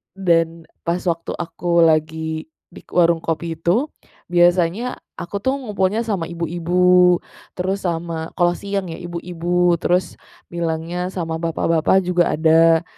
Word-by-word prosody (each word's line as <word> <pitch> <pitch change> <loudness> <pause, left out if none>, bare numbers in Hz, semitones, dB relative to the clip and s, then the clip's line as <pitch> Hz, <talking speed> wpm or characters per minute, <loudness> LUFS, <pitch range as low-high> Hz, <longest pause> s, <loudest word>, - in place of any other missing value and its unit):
Dan 165 -3 +1 0.2
pas 175 +1 0
waktu 170 -2 -2
aku 170 0 0
lagi 160 0 0 0.2
di - - -14
k - - -26
warung 170 -1 +3
kopi 165 0 -2
itu, 175 - +1 0.4
biasanya 175 +6 +2 0.2
aku 200 +3 -5
tuh 260 +6 0
ngumpulnya 210 -4 -1
sama 195 -7 -2
ibu-ibu. 175 +2 +3 0.4
Terus 190 +2 -2
sama 165 -1 -3
kalau 175 -1 +3
siang 195 -3 -4
ya, - - -7
ibu-ibu, 175 0 0
terus 180 0 0 0.3
bilangnya 170 +1 -2
sama 165 -3 -4
bapak-bapak 165 +2 +1
juga 180 -1 +2
ada. 165 +1 +4
175 Hz, 130 wpm, -20 LUFS, 165-180 Hz, 0.4 s, ada